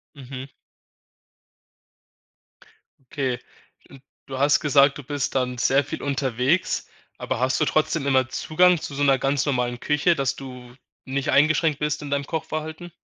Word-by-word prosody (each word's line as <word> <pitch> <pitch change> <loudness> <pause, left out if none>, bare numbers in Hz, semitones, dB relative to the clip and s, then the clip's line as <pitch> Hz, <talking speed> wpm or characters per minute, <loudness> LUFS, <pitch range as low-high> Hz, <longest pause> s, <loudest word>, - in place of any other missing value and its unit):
Mhm. 130 -1 -8 2.7
Okay. 130 -4 -1 0.9
Du 130 -1 -6
hast 145 +2 +4
gesagt, 140 -1 +4
du - - -7
bist 145 -1 -3
dann 125 -1 -1
sehr 135 +3 +3
viel - - -6
unterwegs, 135 +3 0 0.3
aber - - -3
hast 130 +1 +1
du - - +4
trotzdem 155 -1 0
immer 130 -2 +3
Zugang 180 +4 +3
zu 145 - -6
so 140 - -2
'ner 135 -2 +4
ganz 135 +1 0
normalen 125 -3 -1
Küche, 150 +4 +2
dass 135 -1 0
du 125 -2 -10 0.3
nicht 135 +2 -2
eingeschränkt 155 0 +3
bist 150 0 -1
in 145 - -6
deinem 140 0 0
Kochverhalten? 160 +1 -5
140 Hz, 145 wpm, -24 LUFS, 130-150 Hz, 2.7 s, hast